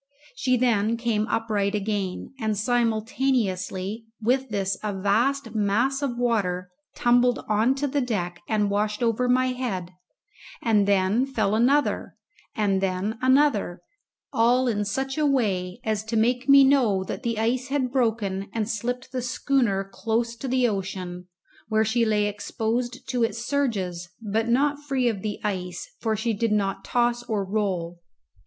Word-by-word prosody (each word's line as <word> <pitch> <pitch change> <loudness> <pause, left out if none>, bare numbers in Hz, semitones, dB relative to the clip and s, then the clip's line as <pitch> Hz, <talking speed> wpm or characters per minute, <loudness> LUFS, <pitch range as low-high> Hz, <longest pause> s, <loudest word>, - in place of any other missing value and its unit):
She 250 0 +1
then 230 -2 +2
came 225 -2 0
upright 215 -3 0
again, 205 +1 -3
and 215 -3 -1
simultaneously 225 -3 0
with 255 +4 +1
this 195 -2 -1
a 205 -2 -3
vast 230 +5 +1
mass 225 +6 +1
of 260 -4 -2
water 185 -7 0 0.2
tumbled 245 0 +3
on 220 +5 +2
to 285 +1 -1
the 285 +1 0
deck 180 -8 -3
and 210 -2 +1
washed 210 +2 0
over 235 +2 +1
my 255 +1 +3
head, 200 -9 -3 0.7
and 210 -3 +2
then 200 +6 +2
fell 220 -7 0
another 265 +7 +2 0.4
and 200 -4 +1
then 195 +4 -1
another, 255 -10 +2 0.5
all 245 +3 +3
in 210 -3 0
such 270 +7 -2
a 305 - +3
way 195 -9 0
as 215 -1 -1
to 225 +1 -1
make 245 +4 +1
me 275 0 +9
know 250 -9 +3
that - - -5
the 235 -3 -2
ice 245 +3 0
had 265 -2 -1
broken 220 -6 0
and 220 -2 -1
slipped 245 +3 -3
the 255 -2 -2
schooner 250 -5 +1
close 230 +3 -1
to 265 - -5
the 255 -1 +2
ocean, 185 -3 -4 0.4
where 220 0 +2
she 230 +2 +2
lay 210 -1 +2
exposed 230 +4 -3
to 245 -2 +1
its 230 +1 -2
surges, 190 -11 -1
but 220 +1 -1
not 285 +4 +2
free 270 -3 0
of 215 -5 -1
the 210 0 -3
ice, 180 -4 -4
for 220 -2 0
she 225 +2 -1
did 225 +1 0
not 195 -2 0
toss 240 0 +1
or 215 -4 -2
roll. 185 -4 -2
225 Hz, 155 wpm, -25 LUFS, 200-250 Hz, 0.7 s, me